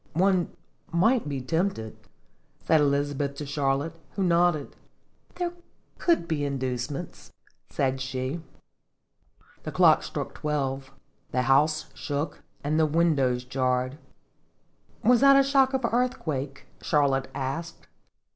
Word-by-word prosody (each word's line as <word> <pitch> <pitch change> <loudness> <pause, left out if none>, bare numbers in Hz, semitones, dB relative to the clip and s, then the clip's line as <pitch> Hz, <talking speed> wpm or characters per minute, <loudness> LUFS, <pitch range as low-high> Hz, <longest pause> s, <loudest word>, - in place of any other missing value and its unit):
" - - -33
One 185 +1 +2 0.4
might 205 - +2
be 135 -2 -3
tempted," 160 - -1 0.7
said 160 -2 +4
Elizabeth 140 0 0
to 150 - -5
Charlotte, 145 +3 -1 0.2
who 195 - 0
nodded. 170 -4 +2 0.3
" - - -35
There 350 -1 -2 0.5
could 335 - +2
be 155 -3 -1
inducements," 130 0 -4 0.4
said 135 -1 -1
she. 130 +4 -3 1.2
The - - -5
clock - - +5
struck - - -5
twelve; 135 -3 -2 0.4
the 125 - 0
house 150 +4 +3
shook, 145 +2 -4 0.2
and 150 +2 +1
the 160 - +4
windows 145 -6 +2
jarred. 130 +1 -1 0.5
" - - -37
Was 245 +2 +5
that 275 0 +8
a 275 - +6
shock 270 -1 +3
of 260 -2 0
earthquake?" 155 - -1 0.2
Char 145 -1 +3
lotte 135 -1 0
asked. 140 +5 -4
145 Hz, 125 wpm, -27 LUFS, 135-170 Hz, 1.2 s, that